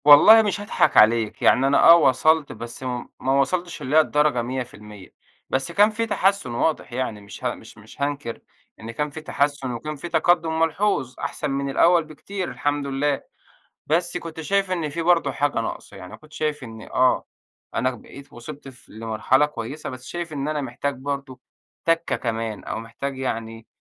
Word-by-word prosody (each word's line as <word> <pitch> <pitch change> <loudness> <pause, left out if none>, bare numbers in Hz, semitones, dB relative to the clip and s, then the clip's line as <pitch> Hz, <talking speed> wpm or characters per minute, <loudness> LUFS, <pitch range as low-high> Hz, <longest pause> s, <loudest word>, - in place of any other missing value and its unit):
والله 150 +10 +9
مش 205 -1 -1
هاضحك 205 - +1
عليك 110 0 +4
يعني 135 +2 +4
أنا 140 - +4
آه 170 - +10
وصلت 155 0 +3
بس 120 +3 -8
م 125 -1 -3
ما 130 - -1
وصلتش 175 +5 -2
اللي 135 +4 -2
هي - - +9
الدرجة 150 -4 +1
100%، 110 -5 -7 0.4
بس 135 +5 -1
كان 205 +5 +5
في 225 +1 -2
تحسّن 195 - +1
واضح 125 +1 -1
يعني 120 -4 -3
مش 100 +4 -12
ه 120 - +1
مش 110 - -15
مش 110 +6 -14
هانكر 140 -5 -3 0.4
إن 115 +1 -7
كان 150 +6 -2
فيه 155 +2 -8
تحسّن 140 -3 -1
وكان 150 +6 -5
في 160 +4 -7
تقدّم 165 -2 +2
ملحوظ 165 -5 0
أحسن 150 - -3
من 140 0 -2
الأول 170 +4 +4
بكتير 180 +5 -6
الحمد 145 -1 -2
لله، 140 +1 0 0.7
بس 170 +3 0
كنت 165 -2 -6
شايف 195 +4 0
إن 170 -4 -1
في 165 +3 -4
برضه 165 -4 +3
حاجة 145 -2 0
ناقصة 115 - -6
يعني 90 -1 -10
أنا - - -8
كنت 155 0 -19
شايف 150 -3 -2
إن 110 -2 -10
آه، 130 0 +2 0.5
أنا 130 - +1
بقيت 135 +3 -12
وصلت 140 +4 -10
ف 130 -2 -15
لمرحلة 115 +6 +1
كويّسة 145 +2 -6
بس 130 -1 -9
شايف 175 -2 -5
إن 140 0 -3
أنا 155 -1 -1
محتاج 140 +2 -3
برضه 135 -1 -5 0.4
تَكّة 165 0 +1
كمان 115 -2 -4
أو - - -4
محتاج 135 +4 -6
يعني 115 -3 -4
140 Hz, 180 wpm, -23 LUFS, 120-160 Hz, 0.7 s, آه